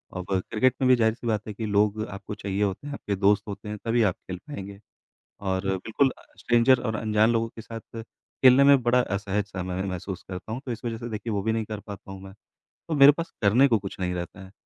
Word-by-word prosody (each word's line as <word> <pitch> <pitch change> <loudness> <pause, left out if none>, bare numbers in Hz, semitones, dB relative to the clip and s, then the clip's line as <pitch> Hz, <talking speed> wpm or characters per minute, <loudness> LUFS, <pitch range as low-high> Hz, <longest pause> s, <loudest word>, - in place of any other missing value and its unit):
अब 90 0 -4 0.3
क्रिकेट 130 +3 +3
में 130 - +3
भी 130 - +7
जाहिर-सी 115 0 0
बात 110 -2 -1
है 105 - -5
कि 110 +2 -5
लोग 105 +1 +1
आपको 100 +2 -7
चाहिए 100 0 -2
होते 100 +8 -2
हैं, 145 - -5
आपके 105 -7 -3
दोस्त 100 +1 +3
होते 105 +1 -7
हैं, 105 - -4
तभी 115 +1 +2
आप 95 -4 +2
खेल 90 -1 -8
पाएँगे। 100 -8 -8 0.6
और 95 -1 -2
बिल्कुल 115 +8 +1
अ, - - -18
स्ट्रेंजर 120 +1 +4
और 110 -3 -2
अनजान 110 +1 +2
लोगों 115 0 +1
के 115 - -8
साथ 115 0 -9 0.4
खेलने 130 +1 +8
में 140 -2 +6
बड़ा 120 +1 +4
असहज-सा 100 -2 -3
मैं 90 +1 -3
महसूस 95 0 -5
करता 95 +3 -7
हूँ, 120 +4 -4
तो 125 - -3
इस 115 - -6
वजह 115 -1 -2
से 120 +1 -6
देखिए 110 +1 -4
वो 100 - 0
भी 110 - +1
नहीं 110 -1 -1
कर 105 -1 -6
पाता 100 -2 -10
हूँ 95 0 -9
मैं। 95 0 -11 0.6
तो 160 - 0
मेरे 140 0 +9
पास 165 +3 -5
करने 115 +6 +5
को 115 -4 +3
कुछ 95 -1 -8
नहीं 90 -1 -1
रहता 90 +2 -6
है, 95 - -13
105 Hz, 240 wpm, -26 LUFS, 100-120 Hz, 0.6 s, मेरे